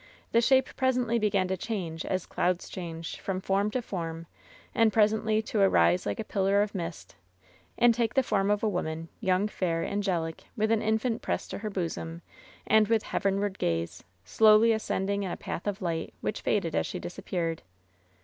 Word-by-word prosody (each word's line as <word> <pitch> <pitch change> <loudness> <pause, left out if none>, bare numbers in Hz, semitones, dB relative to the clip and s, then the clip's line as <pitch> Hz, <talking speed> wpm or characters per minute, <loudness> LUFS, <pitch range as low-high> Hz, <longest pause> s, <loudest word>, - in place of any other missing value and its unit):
The 230 - +4
shape 265 +2 +3
presently 250 -3 +1
began 200 -3 +1
to 190 - +1
change 180 -5 -4
as 185 -2 -1
clouds 180 0 -1
change, 165 -2 -6
from 190 -1 -3
form 195 +2 +1
to 250 +3 -2
form, 165 -5 -5 0.5
and 225 -2 +4
presently 215 0 +2
to 215 -1 -1
arise 90 - +4
like 100 - -2
a - - -1
pillar 200 +1 +2
of 205 - -5
mist, 170 -4 -6 0.6
and 240 0 +6
take 230 -1 -1
the 265 - +4
form 200 -4 +1
of 210 +1 +1
a - - +3
woman, 165 -4 -3
young, 190 -1 +2
fair, 170 -5 -1
angelic, 180 -5 -2
with 215 +1 +1
an 225 -1 +3
infant 220 +2 0
pressed - - -3
to - - -4
her 215 0 -4
bosom, 170 -3 -4 0.4
and 220 -1 +4
with 225 -1 +2
heavenward 200 0 -1
gaz«, 85 0 -2 0.2
slowly 215 - +6
ascending 200 -2 -1
in 195 - -2
a - - -4
path 175 - -5
of 200 -1 -2
light, 165 -2 -3
which 210 - -3
faded 170 -6 0
as - - +1
she - - -4
disappeared. 170 -2 -3
200 Hz, 180 wpm, -28 LUFS, 170-220 Hz, 0.6 s, and